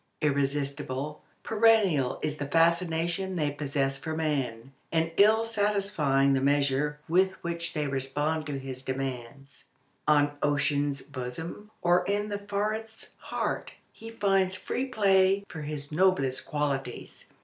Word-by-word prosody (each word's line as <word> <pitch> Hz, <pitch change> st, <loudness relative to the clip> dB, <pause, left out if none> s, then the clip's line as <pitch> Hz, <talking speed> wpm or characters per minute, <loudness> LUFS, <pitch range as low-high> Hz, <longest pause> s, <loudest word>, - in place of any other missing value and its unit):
Irresistible, 140 Hz, 0 st, -1 dB, 0.2 s
perennial 210 Hz, -, +3 dB
is 155 Hz, -1 st, -2 dB
the 145 Hz, -, -4 dB
fascination 170 Hz, +3 st, +1 dB
they 150 Hz, -4 st, 0 dB
possess 140 Hz, -1 st, -1 dB
for 160 Hz, +2 st, -4 dB
man, 135 Hz, -6 st, -2 dB, 0.2 s
and 165 Hz, 0 st, +1 dB
all 220 Hz, +2 st, +4 dB
satisfying 200 Hz, -11 st, +1 dB
the 135 Hz, -, +2 dB
measure 145 Hz, +1 st, +1 dB
with 190 Hz, +3 st, +3 dB
which 170 Hz, 0 st, -3 dB
they 150 Hz, -1 st, 0 dB
respond 145 Hz, +3 st, -1 dB
to 145 Hz, -2 st, -3 dB
his 130 Hz, -1 st, -6 dB
demands. 135 Hz, 0 st, -6 dB, 0.4 s
On 145 Hz, -1 st, +4 dB
ocean's 145 Hz, -1 st, +1 dB
bosom 145 Hz, +9 st, -7 dB
or 175 Hz, +1 st, +4 dB
in 205 Hz, +2 st, -1 dB
the 205 Hz, -1 st, -3 dB
forest's 215 Hz, +2 st, -4 dB
heart -, -, -3 dB, 0.2 s
he 225 Hz, -, -10 dB
finds 195 Hz, -4 st, +1 dB
free 250 Hz, +7 st, -2 dB
play 195 Hz, -4 st, +3 dB
for 160 Hz, -, -7 dB
his 145 Hz, -1 st, -5 dB
noblest 150 Hz, -6 st, +2 dB
qualities. 140 Hz, -4 st, -3 dB
150 Hz, 125 wpm, -28 LUFS, 140-190 Hz, 0.4 s, all